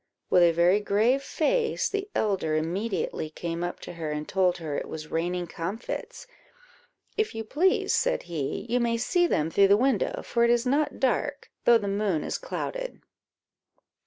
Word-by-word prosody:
With 180 - +6
a 170 -1 +6
very 175 +4 +4
grave 220 +6 +2
face, 480 - 0
the 405 0 -3
elder 190 -7 0
immediately 175 0 -2
came 170 +2 -4
up 175 - -4
to - - -8
her, 165 -2 -4
and 150 0 -4
told 185 -2 +2
her 155 -4 -4
it - - -3
was 155 -1 -7
raining 175 +2 -1
comfits 175 +7 -5 0.9
"If 435 - 0
you 225 - -3
please," 320 - +2
said - - +1
he, 160 -1 -4
"you 245 +1 +1
may 235 -1 +1
see 350 +9 +2
them 160 - 0
through 200 +2 +5
the 200 +1 +5
windows, 255 -2 0
for 235 - +1
it 235 - +4
is 240 0 +3
not 285 +4 +1
dark, 280 +2 -1
though 240 -1 +7
the 205 -3 -4
moon 200 -5 0
is - - -3
clouded." - - -5
200 Hz, 175 wpm, -27 LUFS, 170-250 Hz, 0.9 s, though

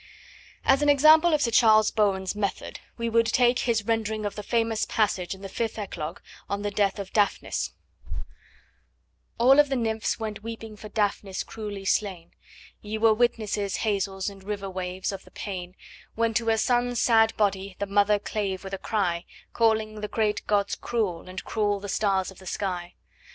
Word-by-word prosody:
As 270 +1 +4
an 295 - +3
example 310 +4 +6
of 300 -2 +2
Sir 235 - +1
Charles 220 -2 +5
Bowen's 195 -3 +1
method 205 -2 -3 0.2
we 235 0 -2
would 230 0 +3
take 245 +1 +3
his 230 -3 +1
rendering 220 -1 -1
of 205 - -2
the 210 - -6
famous 225 0 0
passage 195 -4 0
in 190 - -15
the - - -4
fifth 225 +4 -3
Eclogue 175 -6 -5 0.3
on 200 0 -2
the 205 - -1
death 200 -1 +1
of 195 -2 -7
Daphnis: 205 -2 0 1.6
All 265 +4 +6
of 295 -1 +5
the 270 - 0
nymphs 225 -3 -1
went 215 -1 -4
weeping 225 -1 -7
for 215 +1 -10
Daphnis 205 -3 -1
cruelly 205 -3 -7
slain: 190 -4 -1 0.5
Ye 215 +1 -4
were 220 0 +5
witnesses, 215 -4 0
hazels 195 -2 -1
and 195 -1 -7
river 200 -1 -4
waves, 185 +1 -3
of 195 -1 -7
the - - -17
pain 185 -3 -6 0.4
When 230 0 +1
to 230 0 0
her 225 0 +3
son's 245 +1 +1
sad 225 -2 +4
body 195 -2 0
the 200 - -2
mother 205 +1 +3
clave 200 -2 -3
with 195 0 -8
a 195 - -3
cry, 180 -5 -1 0.3
Calling 220 -2 +1
the 210 - -2
great 215 -1 -1
gods 200 -1 +1
cruel, 195 -7 -2
and 185 +1 -6
cruel 205 -2 0
the 205 - -7
stars 195 -2 0
of 190 - -15
the 190 - -12
sky. 175 -2 -3
210 Hz, 180 wpm, -26 LUFS, 195-225 Hz, 1.6 s, example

